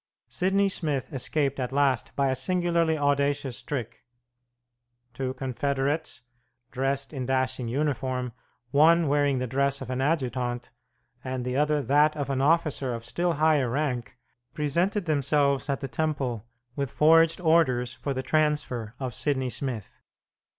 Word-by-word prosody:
Sidney 195 +2 +1
Smith 150 -9 -2
escaped 140 +1 0
at 125 0 -2
last 135 -3 +1
by 140 -1 +2
a - - 0
singularly 170 +2 +1
audacious 145 -2 0
trick. 120 -5 -5 1.1
Two 130 -1 -3
confederates, 140 +3 -2 0.5
dressed 135 +2 -2
in 130 -3 -4
dashing 130 -2 0
uniform, 130 -1 -1 0.4
one 160 +3 +5
wearing 145 -1 +2
the 125 - -1
dress 140 +2 0
of 130 -1 -6
an 130 +1 -1
adjutant, 125 -5 -1 0.5
and 130 -1 -4
the 125 0 -2
other 150 0 +2
that 150 +3 +3
of 140 -2 -2
an 135 -1 0
officer 145 -4 +1
of 115 0 -8
still 175 +6 0
higher 150 -4 +2
rank, 130 -2 -2 0.4
presented 170 +7 0
themselves 140 -2 +1
at 140 - -1
the 135 - -3
Temple 130 -4 -2 0.3
with 140 -2 -2
forged 165 +3 +4
orders 150 -8 +2
for 140 - -4
the 130 -1 -2
transfer 150 -7 0
of 130 -3 -4
Sidney 130 +1 0
Smith. 120 -7 -5
140 Hz, 140 wpm, -27 LUFS, 130-150 Hz, 1.1 s, one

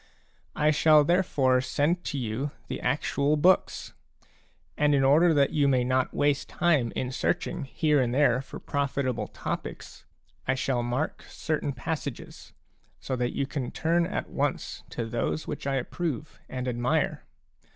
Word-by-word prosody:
I 150 +1 +3
shall 155 0 +5
therefore 140 -7 +2
send 160 +7 0
to 145 - -3
you 125 +3 -2 0.2
the - - -4
actual 145 +2 +1
books; 180 +5 +2 0.8
and 150 -1 +3
in 135 - +3
order 155 +6 +5
that 140 -3 +3
you 145 -2 +2
may 130 -2 +3
not 130 +1 +1
waste 145 -1 +1
time 150 -9 +2
in 125 0 -2
search 130 - 0
ing 170 -4 -4
here 150 +1 +2
and 120 -2 0
there 130 -2 +3
for 135 - -9
profitable 130 -6 -1
topics, - - -6 0.4
I 135 - +2
shall 130 -2 0
mark 125 +6 -2
certain 155 -2 -2
passages, 140 +1 -6 0.5
so 130 - -3
that 120 0 -1
you 140 - 0
can 135 -2 -4
turn 170 +1 +1
at - - -3
once - - -2
to 115 - -4
those 120 +7 -2
which - - -5
I 135 - +1
approve 150 +2 -3
and 130 0 -4
admire. 120 0 0
140 Hz, 155 wpm, -27 LUFS, 130-150 Hz, 0.8 s, shall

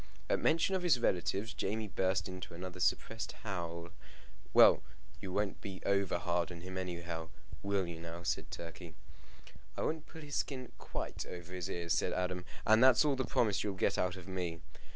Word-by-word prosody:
At - - +3
mention 165 +4 +3
of 190 - +2
his 170 -8 +4
relatives 95 +2 +1
Jamie 110 +1 -1
burst 95 -1 +1
into 95 -2 -7
another 90 +1 -6
suppressed 115 +5 0
howl. 85 -4 -4 0.6
"Well, - - +8 0.4
you 95 - -5
won't 100 +1 -1
be 95 -2 -6
over 100 -3 +2
hard 85 -1 0
upon 85 -2 -8
him 95 0 -6
anyhow: 85 -3 -4 0.3
will 100 -1 +1
you 85 -1 -6
now?" 85 +1 -7
said - - -1
Turkey. 85 0 -8 0.8
"I - - -1
won't 155 0 -1
pull 160 - -10
his 145 -2 -3
skin 130 -3 -2
quite - - -4
over 90 0 -7
his 90 -2 -3
ears," 85 -1 -1
said - - +1
Adam; 90 0 -1 0.2
"and 110 +2 +6
that's 130 +3 +7
all 145 -2 +3
the 130 - 0
promise 115 -6 +2
you'll 100 -2 -2
get 95 +1 +1
out 90 0 +1
of 90 -1 -10
me." 90 -3 -3
95 Hz, 185 wpm, -34 LUFS, 85-110 Hz, 0.8 s, Well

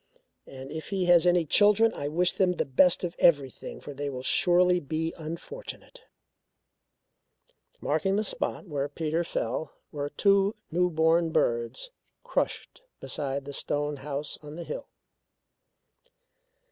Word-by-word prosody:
And 135 +1 -9
if 160 0 -6
he 190 -2 0
has 175 0 +5
any 175 -1 +4
children, 210 +7 +4
I 145 - -4
wish 175 +4 +1
them 185 -2 +2
the - - -1
best 165 +8 +4
of 175 -1 -3
everything 140 -6 +2
for 145 - -9
they 145 +1 -4
surely 180 +4 +4
will 145 - -16
be 160 +2 -2
unfortunate." 175 - -8 1.8
Marking 195 0 0
the 210 - +1
spot 205 - -3
where 145 -3 -2
Peter 160 +3 -1
fell 130 -2 -3 0.2
were 145 -1 -3
two 200 +4 +3 0.2
new 180 +2 +2
born 165 +1 +3
birds 120 - -1 0.3
crushed - - -3 0.2
beside 140 -1 -3
the 145 - -7
stone 145 +1 -1
house 140 +1 -5
on 150 0 -10
the 170 - -6
hill. - - -6
160 Hz, 135 wpm, -28 LUFS, 145-180 Hz, 1.8 s, has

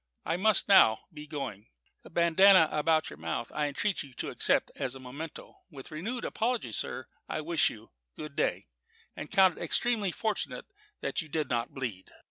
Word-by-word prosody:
I 165 - 0
must 210 +4 +3
now 110 - +6
be 150 0 -9
going. 125 -9 -6 0.3
The - - -14
bandanna 170 0 +6
about 155 +1 +1
your 75 - -10
mouth 80 +9 -4
I 150 -1 0
entreat 190 +8 -1
you 140 -4 -10
to - - -4
accept - - +2
as 130 -1 -3
a - - -9
memento. 140 +5 -9
With 140 -4 -11
renewed 220 +11 -4
apologies, 225 - -1
sir, - - -3 0.2
I - - -2
wish 165 +1 +2
you 110 +1 -12 0.2
good 150 -2 -8
day; - - 0 0.5
and 150 - -7
count 190 -2 +4
it - - -9
extremely 205 +3 +1
fortunate 220 +4 -3 0.4
that - - -1
you 160 - -10
did 150 -3 -2
not 120 -1 -1
bleed." 115 -9 -5
155 Hz, 180 wpm, -29 LUFS, 130-185 Hz, 0.5 s, now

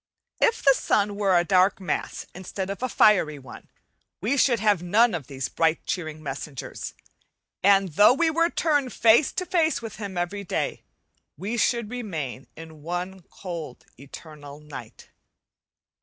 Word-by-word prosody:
If 460 - +2
the 275 - +7
sun 205 -5 0
were 195 -3 +2
a 175 - +3
dark 190 +2 +3
mass 185 - -3
instead 190 +1 -5
of 200 - -7
a 255 - -1
fiery 185 -10 +4
one 130 -3 -13 0.5
we 225 +9 0
should 250 -4 +3
have 205 -4 +2
none 215 +6 +3
of 160 -7 -4
these 135 -2 -4
bright 165 0 0
cheering 155 -3 -4
messengers, 140 -1 -6 0.7
and 195 -1 +4
though 205 - +5
we 325 +2 +2
were 335 +1 +2
turned 290 -7 0
face 230 +5 +4
to 365 - -2
face 335 -3 +1
with 225 -3 -8
him 200 -4 -6
every 175 +4 -2
day 180 - -3 0.6
we 200 +9 -3
should 235 -1 0
remain 160 - -5
in 160 -1 -12
one 180 +4 -4
cold 170 -8 -8
eternal 145 +1 -11
night. 145 -7 -11
190 Hz, 155 wpm, -25 LUFS, 155-230 Hz, 0.7 s, the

